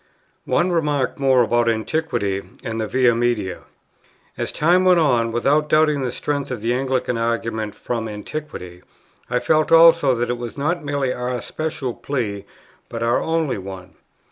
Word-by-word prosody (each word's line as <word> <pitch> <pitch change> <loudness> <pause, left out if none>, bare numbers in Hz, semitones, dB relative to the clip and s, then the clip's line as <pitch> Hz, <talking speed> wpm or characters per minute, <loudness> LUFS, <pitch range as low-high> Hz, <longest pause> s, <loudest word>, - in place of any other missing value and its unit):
One 175 +1 +2
remark 150 -7 0
more 130 -2 +4
about 120 +1 +2
Antiquity 110 -4 -1 0.2
and 115 -2 -3
the 110 - -2
Via 125 +1 +3
Media. 115 -6 -1 0.7
As - - -3
time 175 +4 +3
went 180 -2 +5
on, 120 -7 +2
without 145 +6 +1
doubting 155 -2 +3
the 125 -2 -2
strength 145 +2 -3
of 125 -4 -4
the 115 +2 0
Anglican 130 -2 -1
argument 115 -2 -2
from 115 -2 -4
Antiquity, 105 - -7 0.5
I 125 - +1
felt 155 +5 +1
also 165 -4 +6
that 120 +1 -1
it 120 - -3
was 120 +1 -7
not 170 +4 -1
merely 140 -3 -1
our 125 0 -3
special 155 -5 -4
plea, 105 -9 -4 0.4
but 115 0 -4
our 115 +1 +2
only 160 -8 -1
one. 95 -1 -9
125 Hz, 160 wpm, -21 LUFS, 115-150 Hz, 0.7 s, also